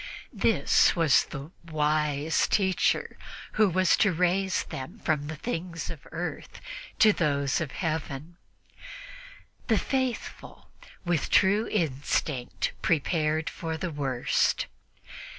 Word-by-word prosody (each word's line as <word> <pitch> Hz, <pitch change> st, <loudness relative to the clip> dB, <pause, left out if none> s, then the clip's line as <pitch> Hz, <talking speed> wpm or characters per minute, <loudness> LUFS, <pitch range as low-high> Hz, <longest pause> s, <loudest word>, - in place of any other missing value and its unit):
This -, -, +3 dB
was 165 Hz, -6 st, +4 dB
the 145 Hz, +3 st, -8 dB, 0.2 s
"wise 150 Hz, 0 st, +1 dB
teacher 190 Hz, -3 st, +1 dB, 0.3 s
who 215 Hz, -2 st, +3 dB
was 185 Hz, 0 st, +3 dB
to 200 Hz, -, +3 dB
raise 180 Hz, +2 st, +1 dB
them 130 Hz, -1 st, -7 dB
from 150 Hz, -2 st, -1 dB
the 155 Hz, -, -5 dB
things 170 Hz, -3 st, -4 dB
of 160 Hz, -5 st, -11 dB
earth 175 Hz, +2 st, -5 dB, 0.4 s
to 215 Hz, -1 st, +6 dB
those 140 Hz, -4 st, 0 dB
of 155 Hz, -, -2 dB
Heaven." 160 Hz, -1 st, -4 dB, 1.3 s
The 225 Hz, -, +3 dB
faithful, 260 Hz, -1 st, -3 dB, 0.3 s
with 175 Hz, -4 st, 0 dB
true 205 Hz, +3 st, +4 dB
instinct, 145 Hz, -6 st, -1 dB
prepared 155 Hz, 0 st, +1 dB
for 160 Hz, -1 st, -4 dB
the 175 Hz, +1 st, -3 dB
worst. 135 Hz, -4 st, 0 dB
160 Hz, 110 wpm, -27 LUFS, 150-185 Hz, 1.3 s, to